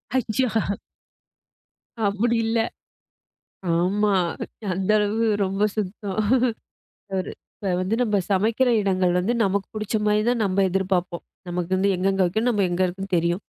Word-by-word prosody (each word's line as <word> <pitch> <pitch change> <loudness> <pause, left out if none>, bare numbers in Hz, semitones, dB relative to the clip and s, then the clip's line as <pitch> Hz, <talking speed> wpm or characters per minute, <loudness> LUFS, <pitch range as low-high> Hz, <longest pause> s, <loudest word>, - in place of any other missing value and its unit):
அச்சோ. 255 0 +1 1.6
அப்படி 220 +4 +1
இல்ல. 225 0 +1 1.2
ஆமா. 200 +4 +2 0.6
அந்த 190 +2 -1
அளவு 210 +2 +1 0.2
ரொம்ப 195 +1 -2
சுத்தம் 200 -1 -3 1.0
அவரு 185 -1 -2 0.3
இப்ப 190 - 0
வந்து 185 +5 0
நம்ம 210 -4 +2
சமைக்கிற 225 +6 +2
இடங்கள் 185 -2 +2
வந்து 190 +7 +1
நமக்கு 200 -1 +1
பிடிச்ச 215 +1 -2
மாரிதான் 215 +3 +2
நம்ம 195 0 +2
எதிர்பார்ப்போம். 185 -2 -1 0.2
நமக்கு 175 0 -3
வந்து 195 +1 +2
எங்கெங்கே 195 +1 +1
வைக்கணும், 220 +7 +1
நம்ம 205 -4 +1
எங்கே 175 +1 +1
இருக்குன்னு 190 +1 -3
தெரியும். 170 +3 0
195 Hz, 125 wpm, -24 LUFS, 185-215 Hz, 1.6 s, ஆமா